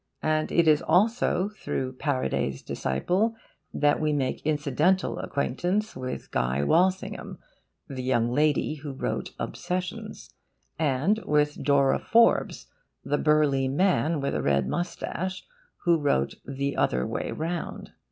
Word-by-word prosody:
And 155 0 +1
it 170 -1 +3
is 155 -1 +5
also 205 -1 +2
through 130 -10 -4
Paraday's 130 - -1
disciple 185 - 0 0.4
that 145 0 +2
we 155 0 +1
make 135 -3 -1
incidental 155 +5 +1
acquaintance 175 +10 -1
with 130 0 -6
Guy 65 +3 0
Walsingham, 185 - +1 0.5
the 130 -2 -5
young 120 -2 +1
lady 150 +1 +2
who 145 -1 -7
wrote 130 - -4
OBSESSIONS, 185 +5 -5 0.5
and 155 +8 +2
with 150 0 +1
Dora 140 -2 +3
Forbes, 230 +1 +3 0.4
the 145 - 0
burly 150 -3 +3
man 160 +1 +2
with 140 - -1
a - - -1
red 70 -2 +1
moustache, 180 +1 -3 0.4
who 170 -2 +3
wrote 70 - +1
THE 140 0 -3
OTHER 65 0 +1
WAY - - -3
ROUND. 165 +2 -4
150 Hz, 125 wpm, -26 LUFS, 130-180 Hz, 0.5 s, is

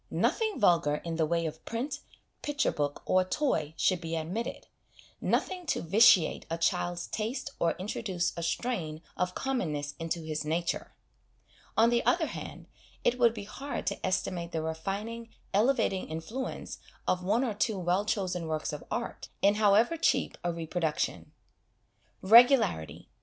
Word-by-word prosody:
Nothing 440 - 0
vulgar 170 -7 +4
in 165 +1 -4
the 160 -2 +2
way 170 +1 0
of 160 0 -5
print, 265 +5 -3 0.4
picture 295 0 0
book, 145 -1 -2
or 185 0 +4
toy 185 - -1
should 185 -2 +2
be 165 -1 -3
admitted 175 +9 -4 0.6
nothing 365 -2 -1
to - - 0
vitiate 190 -1 +5
a 165 - -1
child's 175 +1 0
taste 230 +6 -3
or 170 -1 +2
introduce 185 -1 -2
a 170 - -4
strain 170 -4 -2
of 180 0 -1
commonness 155 - -2
into 165 +1 -2
his 155 -1 -3
nature. 165 +3 -2 0.8
On 230 +2 +5
the 240 0 +2
other 340 -2 +3
hand, - - -7 0.4
it 250 +1 +2
would 235 -1 +4
be 210 - -5
hard 275 +7 -5
to - - -3
estimate 180 -2 -1
the 160 -2 -2
refining, 200 +9 -4 0.2
elevating 215 - +2
influence 165 +12 -5 0.3
of 180 0 +1
one 215 +7 +2
or 235 -5 -1
two 210 0 0
well 180 +2 +1
chosen 185 -5 -1
works 155 -1 -2
of 150 - -6
art, 235 - -4 0.2
in 200 +1 +6
however 215 +9 +4
cheap 265 -4 +1
a 175 - 0
reproduction. 165 -1 -2 0.9
Regularity. 230 - +5
185 Hz, 150 wpm, -30 LUFS, 165-235 Hz, 0.9 s, in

